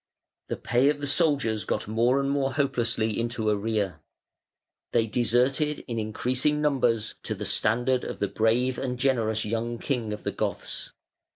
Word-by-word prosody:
The - - -3
pay 125 +4 +2
of 145 -1 0
the 145 - -3
soldiers 140 -8 +2
got - - -2
more 120 +5 +2
and 135 - 0
more 140 -1 0
hopelessly 115 -6 0
into 115 -1 -2
arrear. 100 -5 -1 0.9
They 115 -2 +3
deserted 125 +7 +1
in 115 -3 -2
increasing 125 +7 0
numbers 125 -7 +1
to - - -3
the - - -5
standard 120 +4 +2
of - - -5
the 100 - 0
brave 115 +5 +1
and 125 -2 -2
generous 115 -4 +1
young 115 +2 -2
king 120 -4 -2
of 105 - -5
the - - -1
Goths. - - -3
120 Hz, 160 wpm, -27 LUFS, 110-135 Hz, 0.9 s, They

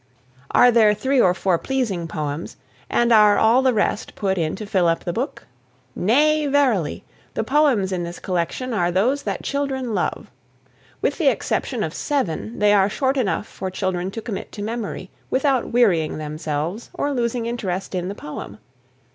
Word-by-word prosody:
Are 245 - +6
there 220 -3 +5
three 260 +4 +2
or 180 -4 +4
four 185 -3 +1
pleasing 225 -11 -2
poems 150 0 -4 0.3
and 240 0 +3
are 210 -2 +6
all 230 +4 +4
the 260 -1 +3
rest 210 -1 -1
put 195 -2 0
in 160 -4 -1
to 215 - -7
fill 190 -4 +2
up 165 0 +1
the 175 - -3
book? 250 - -4 0.5
Nay, 295 +9 +3
verily! 265 - +1 0.3
The - - 0
poems 255 -7 +2
in 180 -2 -1
this 170 0 -5
collection 185 +8 -2
are 175 -5 +1
those 235 +11 +1
that - - -4
children 265 -4 -2
love. - - -2 0.7
With - - 0
the - - +2
exception - - 0
of - - -3
seven, 240 - -2
they 210 0 +4
are 200 -1 +4
short 265 +5 0
enough 225 -6 0
for 190 - -6
children 185 -1 -2
to 220 +3 -7
commit 210 -5 -5
to 205 - -5
memory 215 -4 -5 0.2
without 265 -1 +1
wearying 190 -12 +2
themselves 155 +6 -4
or 285 - -1
losing 235 -2 -1
interest 195 -6 -3
in 180 -1 -2
the 200 - -5
poem. 150 - -8
210 Hz, 170 wpm, -22 LUFS, 180-250 Hz, 0.7 s, Are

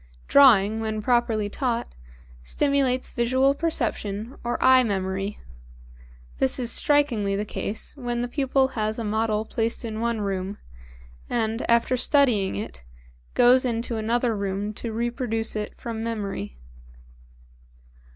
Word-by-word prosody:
Drawing 220 -6 +6
when 220 -1 -2
properly 225 -2 +1
taught 230 - -2 0.5
stimulates 265 - 0
visual 260 +3 +2
perception 235 -7 -2
or 240 0 -1
eye 260 0 +6
memory; 195 -2 -2 1.0
this 130 - +1
is 240 -2 -1
strikingly 245 -11 +2
the 205 +1 -2
case 210 +4 -4
when 240 -3 -3
the - - -2
pupil 265 0 +1
has 215 -3 -2
a 230 - -3
model 215 0 0
placed 225 +1 -2
in 220 -1 -4
one 235 -2 -1
room, 195 0 -3 0.7
and, 225 0 -1
after 235 +2 +3
studying 245 - +3
it, 60 -11 -7 0.5
goes 250 +1 +6
into 235 -1 -1
another 230 +1 0
room 200 +1 -3
to 230 +2 -4
reproduce 230 -1 -2
it 210 -1 -4
from 225 -1 -5
memory. 200 - -4
225 Hz, 125 wpm, -24 LUFS, 210-250 Hz, 1.0 s, Drawing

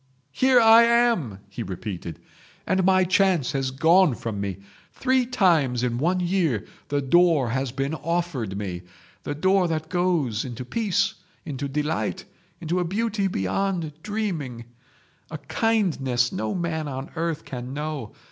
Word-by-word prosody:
"Here 255 - +4
I 225 0 +8
am!" 235 - +2
he 100 +4 -7
repeated, 90 -5 -6 0.5
"and 190 +1 +1
my 185 0 +4
chance 185 -6 +2
has 135 -2 -1
gone 160 +3 +4
from 110 -4 -4
me. 100 -3 -3 0.4
Three 260 -1 +1
times 160 - +2
in 120 -1 -1
one 175 +6 +1
year 175 - 0 0.2
the 145 -1 -1
door 160 -3 +4
has 130 0 -1
been 135 +3 -2
offered 160 - -2
me—the 90 - -7
door 185 +3 +3
that 160 -1 -3
goes 165 - 0
into 125 -1 -6
peace, 200 - 0 0.3
into 140 -3 -4
delight, 150 +6 -2 0.3
into 175 +2 -1
a - - +1
beauty 205 +2 -1
beyond 170 - -1
dreaming, 165 - -3 0.6
a 155 - -5
kindness 145 - 0
no 110 0 -3
man 160 -3 -2
on 135 -1 -6
earth 165 -1 -2
can 125 -1 -6
know. 150 -5 -5
155 Hz, 140 wpm, -24 LUFS, 125-185 Hz, 0.6 s, I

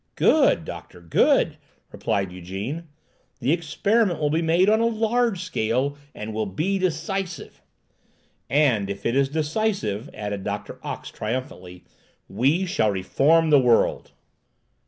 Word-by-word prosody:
"Good, - - +3
doctor, 90 - -9
good!" 85 -2 +2 0.3
replied 95 -2 -2
Ygène. 95 - -6 0.5
"The 130 +2 +1
experiment 180 +5 +1
will 150 -1 +1
be 160 +2 +1
made 170 +3 +3
on 215 +1 +4
a 230 - +3
large 225 -3 0
scale, 135 -4 -1 0.2
and 110 +1 -6
will 110 -1 -2
be 175 - -1
decisive." 180 0 -3 0.9
"And 125 -9 +2
if 100 0 -6
it 115 - +1
is 135 0 +2
decisive," 155 - -1
added 105 -2 -5
Doctor 100 +1 -5
Ox - - -6
triumphantly, 105 -7 -5 0.4
"we 140 - +1
shall 110 -11 +1
reform 150 - +2
the 145 - +7
world!" 120 -3 +2
140 Hz, 130 wpm, -24 LUFS, 105-175 Hz, 0.9 s, the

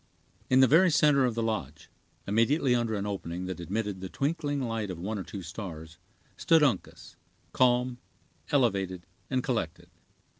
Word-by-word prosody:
In 130 +1 +5
the 130 - +7
very 170 +7 +5
center 150 -4 +4
of 120 -3 -1
the 115 - -1
lodge, 80 - -4 0.3
immediately 125 +6 +2
under 120 -2 0
an 100 0 -3
opening 90 -3 -4
that 95 -1 -5
admitted 100 +2 -3
the 95 - -5
twinkling 145 - -1
light 115 -5 -2
of 90 - -5
one 100 +5 -4
or - - -4
two 95 +3 -8
stars, 80 -3 -8 0.4
stood 160 -2 +4
Uncas, 135 -5 -1 0.4
calm, 125 0 +2 0.5
elevated, 95 -9 0 0.2
and 130 -1 0
collected. 110 -11 -3
110 Hz, 155 wpm, -28 LUFS, 95-130 Hz, 0.5 s, the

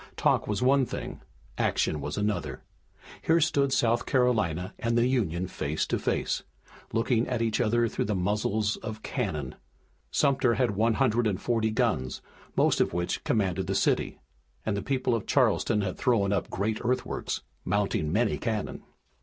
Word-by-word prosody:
Talk - - +2
was 105 +3 -1
one 135 +1 +4
thing, - - -6 0.4
action 75 - +1
was - - -4
another. 100 -11 -2 0.6
Here 165 +1 +3
stood 140 -3 +2
South 120 -2 +2
Carolina 110 - +1
and 115 +1 0
the 120 - +4
Union 100 -9 0
face 75 -1 -2
to - - -1
face, - - -1 0.5
looking 115 +1 +1
at 120 -2 -1
each 115 +1 +1
other 120 0 +2
through - - -2
the 105 0 -1
muzzles 105 +3 0
of 110 -1 -7
cannon. 80 - -3 0.6
Sumter 135 -4 +2
had 125 -4 +2
one 110 +3 +2
hundred 120 -3 +2
and 100 -3 -1
forty 115 -1 +1
guns, 110 - -1 0.3
most - - +3
of - - +1
which 85 0 -2
commanded 95 -4 0
the 95 - -1
city, - - +1 0.5
and 105 - 0
the 100 - -2
people 130 +1 0
of 115 -3 -2
Charleston 105 - +2
had 95 -2 -3
thrown 100 -5 +2
up 100 - -1
great 105 +3 -1
earthworks, 125 +1 -2 0.2
mounting 95 -5 0
many 110 +4 +1
cannon. 110 -3 -3
110 Hz, 160 wpm, -28 LUFS, 100-120 Hz, 0.6 s, one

